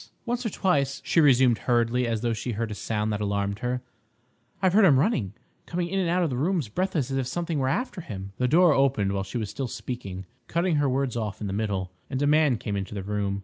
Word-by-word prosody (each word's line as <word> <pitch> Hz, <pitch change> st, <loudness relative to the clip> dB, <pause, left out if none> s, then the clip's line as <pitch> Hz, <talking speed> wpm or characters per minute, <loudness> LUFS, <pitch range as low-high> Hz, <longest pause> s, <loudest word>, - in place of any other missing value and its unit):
"Once 240 Hz, 0 st, -1 dB
or 225 Hz, -, -1 dB
twice," 140 Hz, -9 st, +1 dB
she 165 Hz, -, +3 dB
resumed 130 Hz, -5 st, +5 dB
hurriedly, 120 Hz, 0 st, +1 dB
as 115 Hz, -2 st, -1 dB
though 120 Hz, -1 st, 0 dB
she 115 Hz, +2 st, -3 dB
heard 110 Hz, +1 st, -3 dB
a -, -, -2 dB
sound 105 Hz, 0 st, -2 dB
that 105 Hz, -, -2 dB
alarmed 100 Hz, 0 st, -1 dB
her, 125 Hz, +1 st, -2 dB, 0.8 s
"I've 185 Hz, -2 st, +2 dB
heard 215 Hz, +2 st, +6 dB
him 145 Hz, -7 st, +6 dB
running—coming 140 Hz, -, -2 dB
in 195 Hz, +2 st, -1 dB
and 180 Hz, -3 st, +1 dB
out 180 Hz, +1 st, +2 dB
of 160 Hz, -, 0 dB
the 125 Hz, -, -2 dB
rooms 160 Hz, -, 0 dB
breathless 155 Hz, -, -1 dB
as 135 Hz, -, 0 dB
if 130 Hz, -2 st, -1 dB
something 170 Hz, +1 st, -2 dB
were 130 Hz, -1 st, +1 dB
after 240 Hz, -, -2 dB
him—" 100 Hz, -, -7 dB
The 125 Hz, -, +2 dB
door 170 Hz, +3 st, +5 dB
opened 130 Hz, -8 st, +2 dB
while 100 Hz, 0 st, -1 dB
she 95 Hz, +5 st, -5 dB
was 110 Hz, -3 st, -3 dB
still 135 Hz, -, -3 dB
speaking, 100 Hz, -6 st, -6 dB, 0.2 s
cutting 170 Hz, -1 st, +1 dB
her 145 Hz, -2 st, +2 dB
words 130 Hz, -1 st, 0 dB
off 110 Hz, -3 st, -3 dB
in 105 Hz, -, -4 dB
the 95 Hz, -, -3 dB
middle, 100 Hz, -3 st, -2 dB, 0.2 s
and 130 Hz, -, -2 dB
a 145 Hz, -, +2 dB
man 150 Hz, -4 st, +4 dB
came 105 Hz, -1 st, -4 dB
into 100 Hz, +1 st, -4 dB
the 100 Hz, -, -4 dB
room. 100 Hz, 0 st, -2 dB
125 Hz, 240 wpm, -26 LUFS, 105-160 Hz, 0.8 s, heard